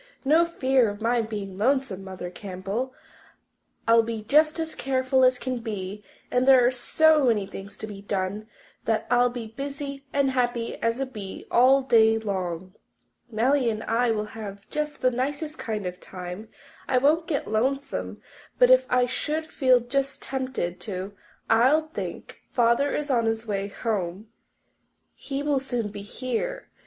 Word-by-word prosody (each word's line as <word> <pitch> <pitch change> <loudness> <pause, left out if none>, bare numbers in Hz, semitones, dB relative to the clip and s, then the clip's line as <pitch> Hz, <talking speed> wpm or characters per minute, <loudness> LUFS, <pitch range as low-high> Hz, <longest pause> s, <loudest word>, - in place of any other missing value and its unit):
"No 320 +5 +5
fear 260 -7 +2
of 205 0 -7
my 235 +1 +2
being 205 -4 -5
lonesome, 250 -5 +1
Mother 185 -2 -7
Campbell. 195 +7 -4 1.0
I'll 230 0 +7
be 225 -1 -4
just 305 +7 +3
as 320 -1 -2
careful 260 0 +1
as 255 0 +5
can 255 -1 -3
be 205 -3 -5 0.3
and 250 +1 +2
there 260 -2 +7
are 245 - +4
so 305 +4 +4
many 215 -4 +2
things 195 +1 -9
to - - -5
be 205 -2 -9
done 200 +1 -3 0.4
that 225 -1 0
I'll 245 0 +5
be 245 -1 -5
as 220 - -10
busy 280 0 -5
and 280 -1 +2
happy 245 -2 -1
as 230 +2 0
a 270 - 0
bee 210 -7 -8
all 265 +3 +5
day 225 -3 +5
long. 185 -4 -3 0.6
Nellie 245 +3 +2
and 220 0 -3
I 235 +2 +1
will 215 -2 0
have 200 -2 -8
just 300 -2 -3
the 255 - +4
nicest 285 +5 -3
kind 215 -3 -3
of 180 - -2
a - - -31
time. 180 +3 -8 0.4
I 260 - +2
won't 305 +6 +3
get 290 - -1
lonesome, 265 +6 -2 0.3
but - - +6
if - - +6
I 250 0 +3
should 305 +5 -2
feel 255 -3 +4
just 270 +3 -2
tempted 255 -10 -3
to, 190 +1 -5 0.3
I'll 270 +8 +4
think, - - -7
Father 240 +4 +2
is 295 -1 -2
on 230 -3 +2
his 225 0 -1
way 200 -2 -2
home. 200 -1 -3 0.8
He 275 0 -5
will 290 -2 +2
soon 245 -5 -2
be 205 0 -8
here.' 255 - -4
240 Hz, 165 wpm, -26 LUFS, 210-270 Hz, 1.0 s, I'll